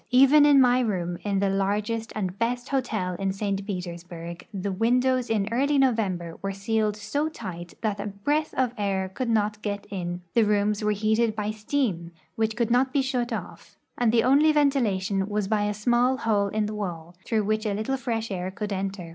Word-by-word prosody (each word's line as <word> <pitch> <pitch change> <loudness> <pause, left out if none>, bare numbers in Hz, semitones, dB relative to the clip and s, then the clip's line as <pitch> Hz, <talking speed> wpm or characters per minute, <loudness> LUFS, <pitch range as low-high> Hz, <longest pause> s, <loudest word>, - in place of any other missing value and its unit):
Even 275 +4 +6
in 285 -2 +7
my 250 -1 +5
room, 180 -7 -1
in 200 -1 0
the 195 0 +2
largest 210 +4 -1
and 195 -2 -3
best 245 +2 -1
hotel 225 -9 -1
in 195 -1 0
St. 195 0 -2
Petersburg, 175 -2 -6
the 200 -1 -3
windows 250 +5 +2
in 210 -3 +1
early 280 +5 +2
November 200 -10 0
Avere 195 0 -2
sealed 215 +1 0
so 250 +9 -2
tight 180 - -8
that 210 -2 -1
a 205 - -3
breath 290 +11 -1
of 255 -2 +1
air 190 -2 -1
could 235 +6 -3
not 215 -1 +1
get 205 -1 -3
in. 175 -2 -4
The 230 - +4
rooms 210 0 +1
Avere 210 0 +1
heated 220 +2 +1
by 210 0 -2
steam, 210 -6 -2 0.2
Avhich 220 0 0
could 235 -1 0
not 255 +2 +3
be 275 0 +2
shut 250 -3 -1
off, - - -7 0.2
and 240 -2 +2
the 230 -1 +3
only 285 +5 +5
ventilation 220 -10 +1
Avas 210 -1 -1
by 210 0 +1
a 210 - 0
small 240 +5 +2
hole 210 -5 +1
in 215 +1 -1
the 210 - -4
Avail, 175 -5 -5
through 215 -2 0
Avhich 215 +1 0
a 200 - -1
little 220 +6 -1
fresh 230 -4 -3
air 185 -1 -3
could 205 +2 -4
enter. 190 -2 -4
210 Hz, 195 wpm, -26 LUFS, 195-240 Hz, 0.2 s, in